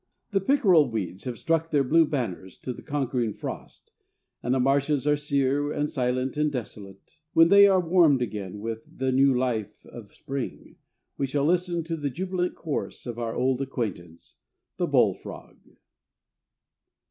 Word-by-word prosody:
The 195 -1 +1
pickerel 190 - +4
weeds 100 -4 -4
have 125 -2 -4
struck 165 -1 0
their 145 -3 +2
blue 160 +5 +4
banners 110 - -4
to 125 - -3
the - - -11
conquering 130 -6 -2
frost, - - -8 0.5
and 125 +2 0
the - - +1
marshes 140 +2 +1
are 150 0 +4
sere, 145 0 0
and 150 0 -2
silent, 130 +2 -1
and 150 0 +1
desolate. 110 +1 -8
When 165 0 +6
they 200 +1 +8
are 190 -1 +4
warmed 165 -5 +4
again 100 -3 -6
with 115 0 -7
the 130 0 0
new 135 +1 +4
life 110 -5 -2
of 115 -4 -12
spring, 135 -2 -6 0.4
we 135 - 0
shall 140 +1 0
listen 175 0 +1
for 165 +1 -4
the 145 -2 -2
jubilant 180 +5 -2
chorus 155 -4 -4
of 120 -1 -5
our 115 -1 -3
old 130 0 +1
acquaintance, 100 -11 -5 0.4
the - - 0
bullfrog. - - 0
135 Hz, 160 wpm, -26 LUFS, 120-160 Hz, 0.5 s, they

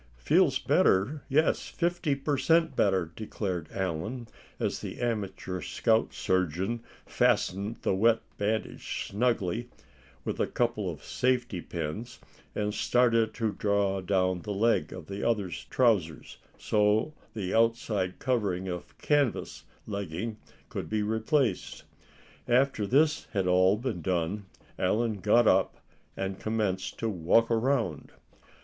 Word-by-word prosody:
"Feels - - +3
better, 120 +11 +2
yes, 155 +3 +2
fifty 170 -4 0
per 140 +1 -1
cent 165 +5 +3
better," 95 -5 +2
declared 95 -6 -4
Allan, 95 +7 -3 0.3
as - - -1
the - - -7
amateur 100 -6 -3
scout 115 -1 +1
surgeon 95 +5 -1 0.2
fastened 100 +4 +1
the - - +2
wet 115 +4 +3 0.2
bandage 110 +2 -2
snugly 115 0 0 0.6
with - - -3
a - - +2
couple 115 -5 -1
of 75 -3 -7
safety 125 -7 0
pins, 90 +11 -5 0.4
and 105 0 -1
started 115 0 +3
to 110 -3 0
draw 100 -1 0
down 95 -1 +1
the 105 +1 -4
leg 115 +3 +2
of - - -8
the 100 +1 -5
other's 105 -6 -1
trousers, 100 -11 +1 0.2
so 105 +7 +2 0.2
the 95 -4 -3
outside 110 -5 +1
covering 100 -8 -1
of 90 -1 -6
canvas 145 -5 0 0.2
legging 100 +1 -4 0.3
could - - -5
be 110 -1 0
replaced. 110 +1 0 0.6
After 125 -4 +2
this 150 +6 +3
had 100 -3 +1
all 95 +2 +4
been 115 -7 -3
done, 90 +4 -1 0.3
Allan 110 +3 +1
got 110 +4 +4
up, - - +3 0.4
and 95 0 -3
commenced 100 -4 -2
to 115 - -2
walk 105 +4 +2
around. 115 - 0
105 Hz, 125 wpm, -29 LUFS, 95-120 Hz, 0.6 s, all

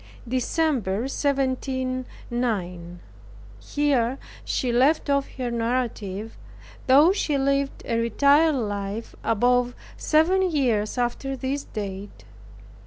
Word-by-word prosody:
DECEMBER, 255 - 0
1709. 255 - -2 0.6
Here 270 - 0 0.3
she 250 - -1
left 280 +5 +3
off 280 -1 +1
her 250 -2 -2
narrative, 230 -3 -2 0.5
though 285 +7 +7
she 310 -7 0
lived 275 0 0
a 230 -2 0
retired 280 +7 +4
life 205 -2 -3
above 245 +2 +2 0.2
seven 325 +5 +3
years 245 -9 0
after 250 +3 -1
this 270 +2 -3
date. 200 -1 -7
255 Hz, 95 wpm, -24 LUFS, 225-275 Hz, 0.6 s, though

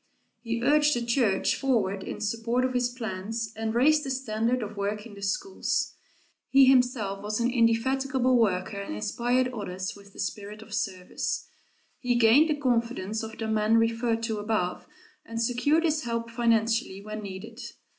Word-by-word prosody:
He 230 0 -3
urged 300 +1 +4
the 240 -1 -2
church 230 -5 +2
forward 220 -8 0
in - - -6
support 230 +4 0
of 255 - -1
his 245 -1 +1
plans, 225 -1 -4
and 220 +1 -3
raised 300 +5 +4
the 275 - -4
standard 245 -2 -1
of 210 0 -7
work 205 +1 -3
in 230 - -11
the 200 - -11
schools. 200 - -1 0.6
He 270 0 +7
himself 245 -6 +2
was 210 +2 -2
an 240 +1 +1
indefatigable 255 +2 +2
worker 200 -3 +1
and 200 - -5
inspired 245 - 0
others 190 -6 -5
with 200 -1 -16
the - - -14
spirit 205 +2 -5
of 220 - -12
service. 195 -4 -3 0.5
He 245 -1 0
gained 240 +7 +5
the 305 - +2
confidence 235 -6 -1
of 220 0 -7
the 220 - -3
man 220 +1 +3
referred 230 0 +1
to 220 -2 -2
above 205 -4 -2 0.4
and 230 0 -6
secured 250 +7 +2
his 315 -2 +1
help 230 -3 -3
financially 230 -3 +1
when 215 0 -5
needed. 200 +3 -8
230 Hz, 165 wpm, -27 LUFS, 210-250 Hz, 0.6 s, He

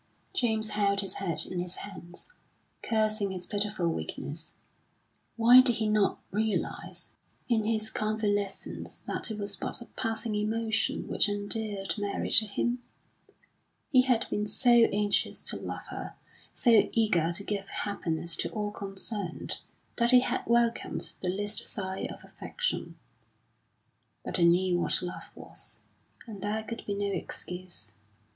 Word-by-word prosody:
James 220 -10 +1
held 200 -1 +2
his 195 - -5
head 170 -4 -1
in 180 - -4
his 175 0 -2
hands, 190 - -7 0.5
cursing 215 -2 +1
his 185 -2 -4
pitiful 205 -4 -1
weakness. 80 - -4 0.8
Why 240 +3 +9
did 250 -3 +6
he 220 0 0
not 210 -1 +2
realise, 215 +1 -2 0.4
in 225 -3 +2
his 220 0 0
convalescence, 205 -2 -2
that - - -3
it 220 - -4
was 200 -1 -4
but - - -3
a 235 - -9
passing 225 -1 -3
emotion 220 +1 0
which - - +2
endeared 205 -1 +3
Mary 205 -1 -2
to 220 - +5
him? 240 +4 -1 1.1
He 255 -4 +7
had 250 -3 +2
been 210 0 0
so 245 +4 +4
anxious 210 -4 +3
to - - -1
love - - -6
her, - - -6 0.4
so 230 -4 +5
eager 180 -8 +3
to 200 +3 +1
give 200 -1 -3
happiness 170 -4 -2
to - - -2
all 210 -1 -3
concerned, 195 -1 -3 0.4
that 235 0 +3
he 250 0 +8
had - - 0
welcomed 235 0 +1
the 180 - 0
least 205 +3 -1
sign 190 -1 -3
of - - -11
affection; 485 0 -3 1.3
but - - -1
he 170 - +4
knew 175 +1 +4
what - - +3
love 180 0 -6
was, - - -10 0.4
and 210 -5 -9
there 210 +2 -1
could 230 +1 -6
be 200 - -1
no 200 0 -1
excuse. 180 - -5
210 Hz, 145 wpm, -29 LUFS, 195-225 Hz, 1.3 s, Why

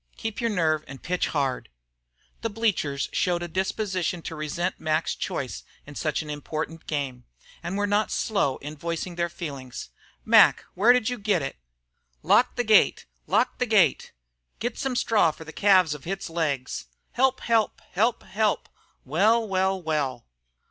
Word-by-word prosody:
Keep 225 +1 -4
your 230 - +1
nerve 160 -6 +1
and 135 -1 -10
pitch 180 +1 0
hard." 135 -4 -1 0.7
The 230 - -1
bleachers 205 -11 0
showed 175 -1 +1
a - - -3
disposition 185 -1 -2
to 165 - -5
resent 155 +4 -3
Mac's 155 +1 0
choice - - -4 0.2
in 145 - -10
such 150 +1 -1
an 150 - -10
important 155 +2 -5
game, 135 -5 -3 0.4
and 185 +3 -3
were 205 - +1
not 205 +1 +1
slow 195 -11 0
in 150 +2 -6
voicing 170 +3 -4
their 170 0 -1
feelings. 140 - -7 0.4
"Mac, - - +6
where 210 +6 +5
did 250 -2 +3
you 245 -2 -4
get 205 -7 +1
it?" 135 - -4 0.7
"Lock 250 - +4
the 245 - 0
gate! 215 -3 +4 0.2
Lock - - +1
the - - +1
gate!" - - +3 0.5
"Get 240 +2 -3
some 270 -3 -2
straw 220 -7 +3
for 160 - -8
the 160 0 -11
calves 185 -6 +4
of 150 +1 -10
its 195 -2 -4
legs!" 140 - -2 0.2
"Help! 265 +1 +2
Help! 225 -2 +1
Help! 225 +5 +1
Help!" 215 0 0 0.4
"Well! 215 - +3
Well! 165 - -1
175 Hz, 160 wpm, -26 LUFS, 150-210 Hz, 0.7 s, Mac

